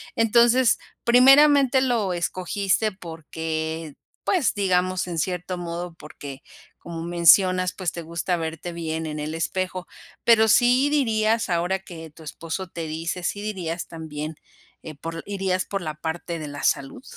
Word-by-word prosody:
Entonces 235 Hz, +2 st, +4 dB, 0.3 s
primeramente 270 Hz, +2 st, +6 dB
lo 230 Hz, -8 st, +1 dB
escogiste 190 Hz, +4 st, 0 dB
porque 160 Hz, -3 st, -5 dB, 0.3 s
pues 355 Hz, -10 st, +2 dB
digamos 185 Hz, -2 st, 0 dB
en 170 Hz, -2 st, -4 dB
cierto 180 Hz, +1 st, -2 dB
modo, 175 Hz, 0 st, -5 dB
porque 140 Hz, -3 st, -10 dB, 0.4 s
como 165 Hz, -1 st, -7 dB
mencionas, 180 Hz, +2 st, +4 dB
pues 185 Hz, -4 st, -3 dB
te 170 Hz, -, -6 dB
gusta 170 Hz, +2 st, -2 dB
verte 165 Hz, +1 st, -5 dB
bien 160 Hz, -1 st, -3 dB
en 150 Hz, -1 st, -5 dB
el 155 Hz, +1 st, -4 dB
espejo, 185 Hz, +2 st, -2 dB, 0.4 s
pero, 220 Hz, -1 st, +5 dB
¿sí 250 Hz, +5 st, +4 dB
dirías, 225 Hz, -6 st, +1 dB
ahora 175 Hz, +2 st, 0 dB
que 165 Hz, -4 st, -10 dB
tu 160 Hz, +1 st, -15 dB
esposo 165 Hz, +4 st, -5 dB
te 165 Hz, -2 st, -5 dB
dice, 165 Hz, +3 st, -4 dB
sí 205 Hz, +3 st, -2 dB
dirías 180 Hz, -5 st, -4 dB
también, 155 Hz, -1 st, -6 dB, 0.5 s
eh, 155 Hz, -2 st, -8 dB
por 165 Hz, +3 st, -6 dB
irías 190 Hz, -2 st, -1 dB
por 195 Hz, -2 st, -3 dB
la 155 Hz, -2 st, -4 dB
parte 165 Hz, +1 st, -4 dB
de 150 Hz, -, -6 dB
la 145 Hz, 0 st, -7 dB
salud? 135 Hz, -, 0 dB
175 Hz, 145 wpm, -24 LUFS, 160-205 Hz, 0.5 s, primeramente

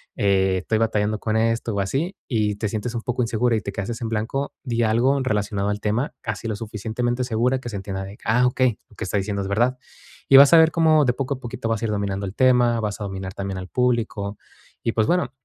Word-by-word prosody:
eh, 95 Hz, -1 st, +2 dB
estoy 110 Hz, +4 st, -1 dB
batallando 110 Hz, -1 st, 0 dB
con 110 Hz, +1 st, -1 dB
esto, 115 Hz, 0 st, 0 dB
o -, -, -1 dB
así, 145 Hz, -, -2 dB
y 105 Hz, -5 st, 0 dB
te 105 Hz, +1 st, -2 dB
sientes 110 Hz, +3 st, -4 dB
un 115 Hz, -, -2 dB
poco 125 Hz, +1 st, -1 dB
insegura 115 Hz, +1 st, +1 dB
y 110 Hz, -, -1 dB
te -, -, -5 dB
quedaste 115 Hz, +5 st, -5 dB
en 115 Hz, -, -2 dB
blanco, 115 Hz, +6 st, -2 dB
di 120 Hz, -4 st, -1 dB
algo 120 Hz, +5 st, +2 dB
relacionado 105 Hz, -4 st, -1 dB
al 105 Hz, 0 st, -2 dB
tema, 110 Hz, +6 st, -1 dB
casi -, -, -4 dB
lo 110 Hz, -, -2 dB
suficientemente 115 Hz, +3 st, -3 dB
segura 125 Hz, +2 st, +1 dB
que 120 Hz, -, -7 dB
se 110 Hz, -, -6 dB
entienda 95 Hz, 0 st, -5 dB
de: 100 Hz, +2 st, -10 dB
"Ah, 125 Hz, +3 st, +3 dB
okey, 125 Hz, -3 st, +1 dB
lo -, -, -20 dB
que -, -, -6 dB
está 95 Hz, +2 st, -1 dB
diciendo 100 Hz, 0 st, -2 dB
es -, -, -4 dB
verdad", 120 Hz, +5 st, +1 dB, 0.5 s
y 135 Hz, -, +9 dB
vas 140 Hz, +3 st, +8 dB
a -, -, +9 dB
ver 160 Hz, 0 st, +6 dB
cómo 155 Hz, -3 st, +4 dB
de 125 Hz, -, +2 dB
poco 135 Hz, +2 st, -2 dB
a -, -, -12 dB
poquito 120 Hz, -2 st, -5 dB
vas 115 Hz, -2 st, -1 dB
a -, -, +2 dB
ir 110 Hz, -, -1 dB
dominando 100 Hz, -1 st, -2 dB
el 95 Hz, -, -6 dB
tema, 125 Hz, -2 st, +4 dB
vas 105 Hz, -1 st, -3 dB
a -, -, -2 dB
dominar 95 Hz, -1 st, -5 dB
también 95 Hz, -1 st, -4 dB
al 90 Hz, -, -7 dB
público. 115 Hz, -5 st, -1 dB, 0.5 s
Y 115 Hz, -, 0 dB
pues, 110 Hz, -, +2 dB
bueno, 180 Hz, -8 st, +1 dB
115 Hz, 245 wpm, -23 LUFS, 105-125 Hz, 0.5 s, y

